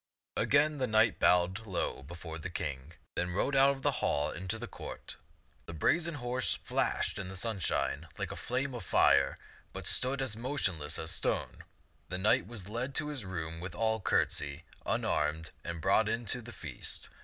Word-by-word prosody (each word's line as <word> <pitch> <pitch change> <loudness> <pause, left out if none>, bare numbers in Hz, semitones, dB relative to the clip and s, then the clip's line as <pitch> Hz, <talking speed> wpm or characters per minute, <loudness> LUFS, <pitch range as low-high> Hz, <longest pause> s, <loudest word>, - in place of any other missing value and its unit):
Again 150 +1 +3
the 130 - +1
knight 110 +1 +4
bowed 90 +5 +3
low 95 -7 -1
before 80 +2 -7
the 90 - -4
King, 75 -3 -4 0.2
then 90 - -1
rode 100 +10 +1
out 135 0 +7
of 135 - -12
the 145 - +4
hall 75 +1 +2
into 95 +6 -3
the 120 - -5
court. - - -8 0.5
The 80 - -6
brazen 165 - +2
horse 125 -1 0
flashed - - 0
in 95 -2 -3
the 95 - -7
sunshine 90 - 0
like - - -2
a - - -4
flame 130 +3 -1
of 120 -4 -5
fire, 70 -5 +4 0.4
but - - -6
stood 130 +2 +2
as 120 -5 -1
motionless 105 - -1
as 80 - -3
a - - 0
stone. - - -1 0.5
The 90 - -1
knight 95 -2 +3
was 105 -5 -6
led 120 +5 -3
to 150 -1 0
his 145 -6 -4
room 80 -4 -4
with 90 0 -6
all 110 +3 +1
courtesy, 70 -4 +1 0.2
unarmed, 75 +2 +1
and 85 0 -4
brought 100 +5 +4
in 115 +1 -1
to 125 - -4
the 120 +1 -9
feast. 80 - -6
95 Hz, 185 wpm, -32 LUFS, 80-125 Hz, 0.5 s, out